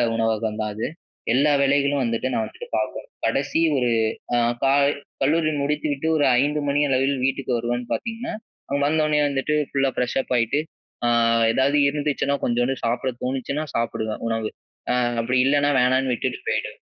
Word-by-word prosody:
உணவகம் 110 Hz, -1 st, -1 dB
தான் 105 Hz, -1 st, -2 dB
அது. 110 Hz, -, -2 dB, 0.5 s
எல்லா 140 Hz, +4 st, +3 dB
வேலைகளும் 140 Hz, 0 st, +2 dB
வந்துட்டு 115 Hz, +2 st, -1 dB
நான் 110 Hz, -, 0 dB
வந்துட்டு -, -, -10 dB
பார்க்கணும். 110 Hz, -, -4 dB, 0.2 s
கடைசி 135 Hz, +3 st, 0 dB, 0.2 s
ஒரு 125 Hz, -2 st, +1 dB, 0.4 s
அ -, -, +3 dB, 0.3 s
க -, -, +4 dB, 0.6 s
கல்லூரி 155 Hz, +3 st, +2 dB
முடித்துவிட்டு 150 Hz, 0 st, -1 dB
ஒரு 145 Hz, -, +3 dB, 0.2 s
5 150 Hz, +2 st, 0 dB
மணி 145 Hz, +1 st, +2 dB
அளவில் 135 Hz, +1 st, +1 dB
வீட்டுக்கு 135 Hz, -1 st, -1 dB
வருவேன் 120 Hz, +1 st, -2 dB
பார்த்தீங்கன்னா, 230 Hz, -1 st, -4 dB, 0.4 s
அங்க 140 Hz, -, 0 dB
வந்தோனே 155 Hz, 0 st, +2 dB
வந்துட்டு 140 Hz, +1 st, -1 dB, 0.2 s
ஃபுல்லா 135 Hz, -1 st, +1 dB
ஃப்ரெஷ் 125 Hz, -, -1 dB
அப் -, -, -16 dB
ஆயிட்டு 115 Hz, +4 st, +1 dB, 0.5 s
அ -, -, +3 dB, 0.4 s
எதாவது 135 Hz, +4 st, +2 dB
இருந்துச்சுன்னா 145 Hz, -1 st, -1 dB
கொஞ்சோண்டு 120 Hz, +2 st, +1 dB
சாப்பிட 120 Hz, +3 st, 0 dB
தோணுச்சுனா 135 Hz, +3 st, -2 dB
சாப்பிடுவேன் 110 Hz, -2 st, -2 dB
உணவு. 115 Hz, -1 st, -1 dB, 0.4 s
அ -, -, +2 dB, 0.3 s
அப்படி 125 Hz, +2 st, 0 dB
இல்லைனா 145 Hz, +1 st, +3 dB
வேணான்னு 130 Hz, +1 st, +2 dB
விட்டுட்டு 120 Hz, -, -2 dB
போயிடுவேன். -, -, -2 dB
135 Hz, 150 wpm, -23 LUFS, 120-145 Hz, 0.6 s, க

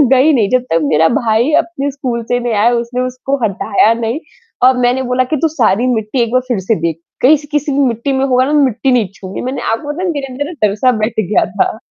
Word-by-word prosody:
गई 280 Hz, +5 st, +4 dB
नहीं, 220 Hz, -7 st, +2 dB
जब 255 Hz, 0 st, +2 dB
तक 165 Hz, -, +3 dB
मेरा 155 Hz, +2 st, +3 dB
भाई 230 Hz, +4 st, +1 dB
अपने 285 Hz, -4 st, -4 dB
स्कूल 250 Hz, -4 st, -4 dB
से 245 Hz, +2 st, -1 dB
नहीं 240 Hz, -2 st, -2 dB
आया 215 Hz, +3 st, +3 dB
उसने 240 Hz, +1 st, -2 dB
उसको 255 Hz, +2 st, -2 dB
हटाया 210 Hz, +1 st, +2 dB
नहीं 230 Hz, +4 st, -3 dB, 0.4 s
और 255 Hz, 0 st, +5 dB
मैंने 250 Hz, +1 st, +1 dB
बोला 255 Hz, +1 st, +2 dB
कि -, -, +2 dB
तू 325 Hz, -, +3 dB
सारी 245 Hz, -6 st, +1 dB
मिट्टी 220 Hz, +3 st, -1 dB
एक 230 Hz, 0 st, -1 dB
बार 255 Hz, -, +2 dB
फ़िर 240 Hz, -5 st, -1 dB
से 190 Hz, +4 st, 0 dB
देख, 165 Hz, -1 st, -2 dB, 0.2 s
कहीं 295 Hz, +5 st, +6 dB
स 295 Hz, -, -12 dB
किसी 295 Hz, -1 st, -1 dB
भी 275 Hz, -, 0 dB
मिट्टी 235 Hz, +3 st, -2 dB
में 265 Hz, -, +1 dB
होगा 255 Hz, -1 st, +2 dB
ना 295 Hz, -, -1 dB
मिट्टी 260 Hz, +1 st, 0 dB
नहीं 240 Hz, -5 st, +2 dB
छूऊँगी, 190 Hz, 0 st, -7 dB
मैंने 255 Hz, +2 st, -4 dB
आपको 290 Hz, +6 st, -3 dB
पता 360 Hz, +4 st, -3 dB
मेरे 285 Hz, -4 st, -3 dB
अंदर 285 Hz, +3 st, -3 dB
ना 320 Hz, -, -6 dB, 0.2 s
डर 200 Hz, -, -3 dB
सा 255 Hz, +4 st, +2 dB
बैठ 220 Hz, +1 st, 0 dB, 0.2 s
गया -, -, +3 dB
था। 200 Hz, +2 st, -1 dB
250 Hz, 245 wpm, -14 LUFS, 225-270 Hz, 0.4 s, कहीं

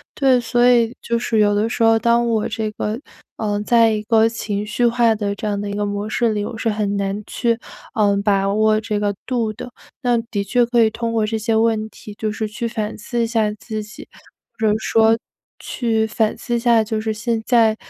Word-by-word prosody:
对， 265 Hz, -3 st, +4 dB
所 240 Hz, +1 st, +2 dB
以 240 Hz, -1 st, +3 dB
就 235 Hz, -, -1 dB
是 230 Hz, -1 st, -1 dB
有 205 Hz, -1 st, +4 dB
的 215 Hz, +2 st, +1 dB
时 230 Hz, -, -1 dB
候， 225 Hz, 0 st, +5 dB
当 235 Hz, +1 st, +2 dB
我 220 Hz, -2 st, 0 dB
这 220 Hz, -1 st, -2 dB
个， 215 Hz, +2 st, -3 dB, 0.4 s
呃， 205 Hz, -1 st, -1 dB
在 230 Hz, +1 st, +4 dB
一 210 Hz, -1 st, -2 dB
个 225 Hz, 0 st, +4 dB
情 210 Hz, -3 st, -3 dB
绪 215 Hz, +3 st, 0 dB
化 235 Hz, -1 st, +3 dB
的， 205 Hz, -1 st, -2 dB
这 215 Hz, -, -5 dB
样 205 Hz, -1 st, -1 dB
的 205 Hz, 0 st, -4 dB
一 -, -, -4 dB
个 205 Hz, 0 st, -1 dB
模 205 Hz, +1 st, -3 dB
式 230 Hz, 0 st, +1 dB
里， 205 Hz, -1 st, -2 dB
我 225 Hz, -, -6 dB
是 225 Hz, -, -1 dB
很 205 Hz, -1 st, -1 dB
难 200 Hz, +1 st, -2 dB
去， 235 Hz, 0 st, 0 dB, 0.4 s
呃， 205 Hz, -2 st, +3 dB
把 195 Hz, -1 st, +2 dB
握 215 Hz, 0 st, +3 dB
这 215 Hz, -1 st, -2 dB
个 205 Hz, -1 st, -1 dB
度 235 Hz, -4 st, -1 dB
的。 245 Hz, -, -9 dB, 0.3 s
那 245 Hz, -3 st, +2 dB
的 210 Hz, -3 st, -3 dB
确 240 Hz, +4 st, +2 dB
可 240 Hz, -1 st, +3 dB
以 220 Hz, -, +3 dB
通 230 Hz, +1 st, -3 dB
过 220 Hz, -2 st, +1 dB
这 220 Hz, +1 st, -2 dB
些 220 Hz, +1 st, 0 dB
问 220 Hz, -1 st, +1 dB
题 210 Hz, -, -11 dB
就 215 Hz, 0 st, -2 dB
是 215 Hz, 0 st, -3 dB
去 230 Hz, +3 st, -4 dB
反 220 Hz, -2 st, -3 dB
思 235 Hz, +3 st, -3 dB
一 -, -, 0 dB
下 225 Hz, -2 st, +1 dB
自 215 Hz, 0 st, -6 dB
己， 215 Hz, +1 st, -12 dB, 0.5 s
或 220 Hz, -, +2 dB
者 210 Hz, -, +3 dB
说 225 Hz, 0 st, +3 dB, 0.4 s
去 225 Hz, -3 st, -1 dB
反 220 Hz, 0 st, 0 dB
思 240 Hz, -, -3 dB
一 -, -, +1 dB
下 235 Hz, -2 st, +4 dB
就 215 Hz, 0 st, -3 dB
是 220 Hz, 0 st, -2 dB
现 220 Hz, +1 st, -2 dB
在， 225 Hz, -3 st, +4 dB
220 Hz, 245 characters per minute, -20 LUFS, 210-230 Hz, 0.5 s, 候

